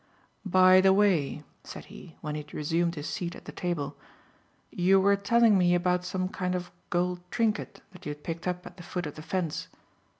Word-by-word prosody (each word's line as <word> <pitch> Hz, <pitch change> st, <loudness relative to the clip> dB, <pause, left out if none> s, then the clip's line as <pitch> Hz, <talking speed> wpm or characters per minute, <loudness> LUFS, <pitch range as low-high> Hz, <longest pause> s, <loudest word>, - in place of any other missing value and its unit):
"By 185 Hz, 0 st, +6 dB
the 190 Hz, 0 st, +5 dB
way," 180 Hz, -8 st, +2 dB, 0.2 s
said -, -, -9 dB
he, 165 Hz, -, -13 dB
when 150 Hz, -2 st, -4 dB
he 150 Hz, -, -3 dB
had 150 Hz, -, -13 dB
resumed 170 Hz, +3 st, 0 dB
his 150 Hz, -1 st, -5 dB
seat 175 Hz, -1 st, -4 dB
at -, -, -13 dB
the -, -, -7 dB
table, 170 Hz, -6 st, -3 dB, 0.8 s
"you 190 Hz, +2 st, +4 dB
were 200 Hz, +1 st, +4 dB
telling 210 Hz, +1 st, +4 dB
me 175 Hz, -1 st, +4 dB
about 180 Hz, 0 st, +1 dB
some 185 Hz, 0 st, -2 dB
kind 185 Hz, -1 st, -2 dB
of 180 Hz, -1 st, -5 dB, 0.2 s
gold 180 Hz, 0 st, 0 dB
trinket 220 Hz, 0 st, -1 dB
that 180 Hz, -, -11 dB
you -, -, -2 dB
had 145 Hz, 0 st, -17 dB
picked 165 Hz, +1 st, -5 dB
up 180 Hz, 0 st, -3 dB
at -, -, -11 dB
the -, -, -10 dB
foot 175 Hz, 0 st, -4 dB
of 150 Hz, -, -5 dB
the 155 Hz, -, -9 dB
fence. 165 Hz, 0 st, -3 dB
180 Hz, 205 wpm, -28 LUFS, 165-185 Hz, 0.8 s, By